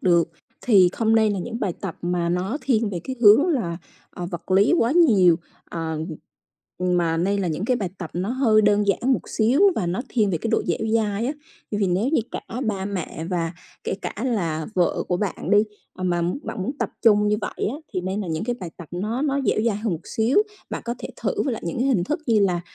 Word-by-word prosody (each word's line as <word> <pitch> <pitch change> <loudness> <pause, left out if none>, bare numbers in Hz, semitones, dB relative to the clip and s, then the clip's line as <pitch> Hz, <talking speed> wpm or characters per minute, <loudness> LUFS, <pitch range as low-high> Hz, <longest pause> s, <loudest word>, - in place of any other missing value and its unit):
được, 170 -2 +3 0.3
thì 195 -7 +5
không 225 -1 +2
nên 220 -2 +4
là 200 - -2
những 230 +6 -5
bài 190 -4 0
tập 195 -4 -5
mà 175 -1 0
nó 185 - -1
thiên 225 -5 +1
về 175 -3 -4
cái 260 - -4
hướng 230 - +7
là, 205 - 0 0.3
ờ, 175 - -6
vật 175 0 -7
lý 195 - +5
quá 235 +3 +2
nhiều, 210 - +5 0.3
ờ, 160 -2 -3 0.8
mà 175 -2 +2
nên 195 +4 +1
là 180 - 0
những 160 +5 -2
cái 250 +2 +2
bài 195 -6 -3
tập 175 -4 -6
nó 185 +5 -2
hơi 235 -4 +3
đơn 205 0 +3
giản 240 +7 +2
một - - +1
xíu 240 - +2
và 180 - -1
nó 180 +7 -1
thiên 215 -5 +1
về 170 - 0
cái 225 - -3
độ 225 - +2
dẻo - - 0 0.2
dai 215 0 +1
á. 275 - 0 0.4
Vì 205 -2 +1
nếu 190 +8 +1
như 315 - +2
cả - - -4 0.3
ba 195 -3 -1
mẹ 180 -5 -4
và 170 -2 -1 0.3
kể - - -1
cả - - -3
là 165 -10 -1
vợ 180 -2 +1
của 180 - +1
bạn 205 -1 -3
đi, 205 - +6 0.4
ờ, 185 - -5
mà 175 -1 +1 0.2
bạn 190 - -4
muốn 265 - -2
tập - - -1
chung 210 -2 +5
như 210 - +2
vậy 210 - -3
á, 265 - -4 0.2
thì 185 - -1
nên 190 +3 -2
là 195 - -4
những 160 +3 -2
cái 240 +1 -2
bài 175 - -5
tập 170 - -10
nó 215 +9 -2
nó 280 -2 +1
dẻo 215 - +2
dai 220 -4 +1
hơn 215 -1 -2
một 165 - -3
xíu. 225 - +1 0.3
Bạn - - -4
có 235 - -2
thể - - -6
thử 415 - 0
lại 230 - -4
những 170 - -3
cái 255 - +1
hình 205 -10 +2
thức 305 - -2
như 225 -4 +4
là, 180 -3 +2
205 Hz, 240 wpm, -23 LUFS, 175-230 Hz, 0.8 s, hướng